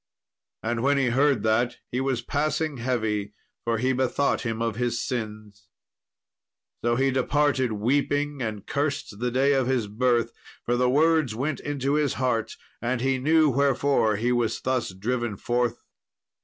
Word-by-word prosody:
And 115 +1 -1
when 140 +2 +3
he 135 -2 +2
heard 135 +2 +2
that, 115 +2 +1
he 125 - -1
was 130 -3 -1
passing 155 +2 -1
heavy, 110 -4 -1 0.3
for 115 -1 0
he 130 +3 +1
bethought 130 +2 +1
him 115 -2 -3
of 115 -2 -1
his 120 0 -1
sins. 105 -5 -5 1.2
So 120 0 +2
he 135 +2 +2
departed 130 -2 +1
weeping, 145 +5 0
and 110 -4 -4
cursed 145 -7 -2
the 125 +1 0
day 135 +3 +2
of 135 -2 +1
his 130 -4 +1
birth, 115 +2 +1 0.3
for 120 - +1
the 125 0 +2
words 155 -3 +3
went 135 +4 -2
into 140 -1 -2
his 150 -3 +1
heart, 115 -4 -1 0.2
and 120 +1 -1
he 130 +1 +1
knew 155 +2 +4
wherefore 135 -4 +2
he 120 +4 0
was 120 -2 0
thus 130 -5 -1
driven 115 +3 -2
forth. 120 +1 -1
125 Hz, 155 wpm, -25 LUFS, 115-140 Hz, 1.2 s, knew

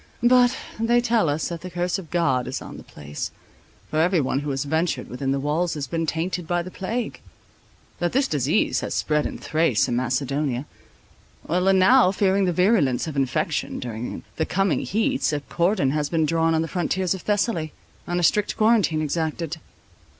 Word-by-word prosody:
But 245 +1 +5 0.2
they 235 +2 +3
tell 230 -8 +2
us 150 +2 -1
that 170 -1 -5
the 185 - -7
curse 175 +2 -1
of 170 -5 -11
God 135 -8 +1
is 130 - -3
on - - -9
the - - -11
place, 75 0 -6 0.6
for 155 - 0
every 175 +1 +3
one 135 -1 0
who 145 +1 -4
has 135 -1 -1
ventured 160 +4 -1
within 135 +2 -3
the 135 - 0
walls 155 +5 0
has 145 -2 -3
been 165 +4 -2
tainted 170 +2 -2
by 175 0 0
the 185 - -9
plague; 225 +6 -4 0.8
that 175 0 0
this 270 +2 +2
disease 145 - +1
has - - -4
spread 150 -1 +1
in - - -7
Thrace 155 -9 +1
and 120 - -1
Macedonia; 130 +2 -1 0.8
and 185 +3 +3
now, 190 +2 +6
fearing 195 0 +2
the 180 - +1
virulence 180 - +2
of 160 -3 -6
infection 135 +3 -1
during 120 -1 -5
the 160 - +1
coming 195 0 +1
heats, 245 - 0
a 145 - -1
cordon 170 -1 +1
has 150 0 -1
been 160 -2 +1
drawn 165 +1 +2
on 160 - +1
the - - -4
frontiers 185 +2 0
of 190 - -6
Thessaly, 205 -6 0 0.4
and 175 0 -1
a - - -1
strict 210 +4 +2
quarantine 215 -8 +3
exacted." 160 +1 -2
165 Hz, 185 wpm, -24 LUFS, 145-190 Hz, 0.8 s, now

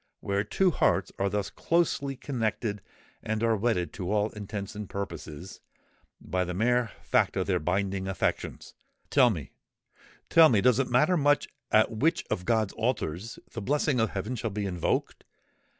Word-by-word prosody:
But - - -15
where 100 0 +1
two 185 - +2
hearts - - +1
are 100 - +1
thus 100 -1 -2
closely 160 -5 0
connected 115 -5 -2 0.4
and 110 +1 -2
are 115 -1 +3
wedded 105 -5 0
to 95 -1 -4
all 105 0 +1
intents 105 -1 -6
and 105 -2 -7
purposes, 95 -3 -7 0.6
by 90 0 -1
the 90 0 -4
mere 120 +3 +2
fact - - +2
of - - +1
their - - +1
binding 95 +3 -1
affections,—tell 125 - -1
me—tell 120 - 0
me, 110 - +4
does 125 +3 +4
it 135 - 0
matter 150 +9 +3
much 145 -1 +2 0.2
at 110 +1 +4
which 160 +10 +1
of 90 - -1
God's 110 -4 +1
altars 110 -4 -2
the 115 - -5
blessing 145 +2 +1
of 110 -1 +2
heaven 105 +6 -3
shall 115 -1 -2
be 105 0 -3
invoked? 90 -3 -1
110 Hz, 160 wpm, -28 LUFS, 100-125 Hz, 0.6 s, me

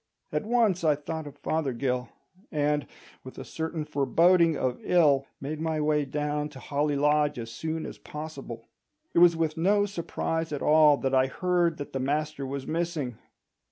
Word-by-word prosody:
At 215 - -2
once 220 -7 +2
I 155 -2 +4
thought 155 +1 -5
of 145 - -11
Fothergill, 130 -4 -1 0.4
and, 150 -1 0 0.4
with 130 - -11
a - - -6
certain 160 -1 -4
foreboding 165 +4 +3
of 125 -1 -1
ill, 145 -6 +3
made 150 +3 -5
my 160 -1 -1
way 150 -1 +1
down 150 +1 -2
to 140 -3 -12
Holly 145 +3 -1
Lodge 150 0 +2
as 115 -1 -6
soon 160 +6 -4
as - - -8
possible. 155 +1 -8 0.5
It - - +4
was 175 -1 +7
with 160 -1 -1
no 205 +5 +3
surprise 165 -4 -3
at 145 - -3
all 150 -1 +6
that 135 -1 -2
I 130 0 +4
heard 175 +2 +1
that 145 - -7
the 135 - -1
master 145 +1 -2
was 135 0 -5
missing. 160 -7 -2
150 Hz, 170 wpm, -27 LUFS, 140-165 Hz, 0.5 s, was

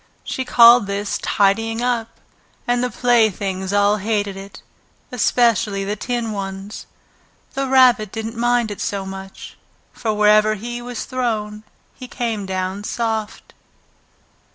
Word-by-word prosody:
She 260 - -3
called 235 -3 +7
this 200 +1 -3
"tidying 225 +3 +1
up," 235 -2 -2 0.5
and 245 0 +1
the 250 - 0
playthings 205 -5 +1
all 205 +1 +3
hated 205 -1 -2
it, 195 +1 -11 0.5
especially 230 -4 +1
the 205 +2 -3
tin 235 +1 -3
ones. 195 0 -6 0.7
The 275 -1 -2
Rabbit 250 -6 +4
didn't 225 +1 -5
mind 240 -1 +1
it 205 - -7
so 200 -1 -3
much, 190 0 -9 0.4
for 225 - -2
wherever 215 0 +4
he 240 +3 -6
was 245 -1 -6
thrown 215 -5 -3 0.3
he 255 - -10
came 225 -6 -3
down 190 +1 -3
soft. 220 -1 -4
215 Hz, 130 wpm, -20 LUFS, 200-240 Hz, 0.7 s, called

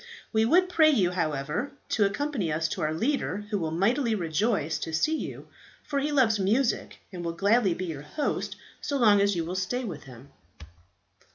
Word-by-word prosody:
We 220 0 +3
would 360 +9 +4
pray 325 -3 +5
you, 195 -12 +3
however, 155 - -2 0.2
to 210 - +2
accompany 210 - -1
us 160 +2 0
to - - -4
our 155 - 0
leader, 210 - -1
who 205 - 0
will 160 -2 -2
mightily 225 - +1
rejoice 175 -1 0
to 160 - -4
see 310 - +2
you, - - -6 0.4
for 285 -2 -2
he 295 +2 -1
loves 240 -7 +3
music, 230 +7 0
and 175 -1 -6
will 170 0 -2
gladly 200 +1 +2
be 185 - -4
your 160 -5 -5
host 150 - -3 0.3
so 285 - -1
long 210 -5 +5
as 200 -1 +2
you 165 -1 -1
will 175 - -4
stay 190 +7 -2
with 170 -10 -6
him." 130 +1 -13
200 Hz, 190 wpm, -27 LUFS, 165-250 Hz, 0.4 s, pray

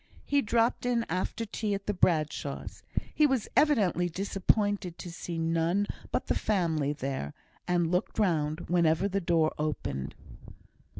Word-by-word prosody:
He 285 -1 +3
dropped 230 0 +1
in 240 -2 +1
after 185 +6 -2
tea 210 -1 -2
at 200 0 -6
the 210 - 0
Bradshaws'; 160 -5 0 0.3
he 300 - +5
was 265 -5 0
evidently 205 - +3
disappointed 195 0 0
to 175 - -7
see 170 0 -5
none 165 +4 +1 0.3
but - - -1
the - - +1
family 165 -8 +1
there, 135 - -4 0.3
and 175 -2 +2
looked 180 0 -1
round 160 -6 +1
whenever 170 +1 +2
the 200 0 -1
door 165 -2 +2
opened. 70 - -3
180 Hz, 140 wpm, -29 LUFS, 160-205 Hz, 0.3 s, he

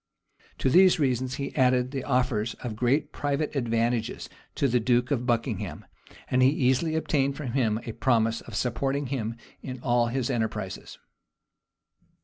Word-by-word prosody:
To - - 0
these 185 +7 +6
reasons 130 -2 0
he 140 - -5
added 125 -1 +3
the 135 -2 -3
offers 125 -4 0
of 120 -4 -6
great 125 +6 +1
private 145 +1 -2
advantages 115 -2 -1 0.3
to 140 - +2
the 125 -1 +2
duke 120 +3 +1
of 125 -3 0
Buckingham; 115 -2 -2 0.4
and 125 - +2
he 130 - +6
easily 140 +3 +1
obtained 140 -3 0
from 140 -6 -4
him 115 -4 +1
a 115 - -4
promise 115 0 +1
of 110 - -10
supporting 135 +6 -1
him 115 -3 -2 0.3
in 130 -1 -6
all 120 -1 +2
his 130 +2 -1
enterprises. 115 -3 -3
125 Hz, 150 wpm, -27 LUFS, 115-135 Hz, 0.4 s, these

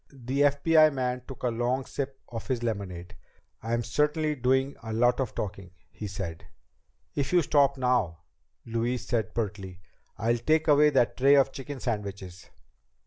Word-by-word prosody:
The 135 0 -3
FBI 155 +2 +5
man 125 -2 -2
took 135 - -10
a 125 - +2
long 120 +3 -1
sip 135 -1 -5
of 115 -2 -7
his 125 -3 -1
lemonade. 95 -6 -4 0.5
"I'm 120 +1 -1
certainly 150 +6 +1
doing 130 +1 +1
a 110 0 -6
lot 120 +3 +2
of 130 -4 -2
talking," 95 -3 -5 0.2
he 105 - -7
said. 95 -4 -6 0.7
"If 140 -1 -2
you 175 -2 +4
stop 140 -1 +3
now," 120 -12 0 0.4
Louise 115 +2 -2
said 110 -3 -2
pertly, 100 -5 -4 0.4
"I'll 115 +2 +1
take 155 +6 +2
away 150 0 +6
that 130 -5 +2
tray 140 +2 +6
of 135 -1 +4
chicken 135 +1 -7
sandwiches." 100 -6 -5
125 Hz, 155 wpm, -28 LUFS, 110-140 Hz, 0.7 s, away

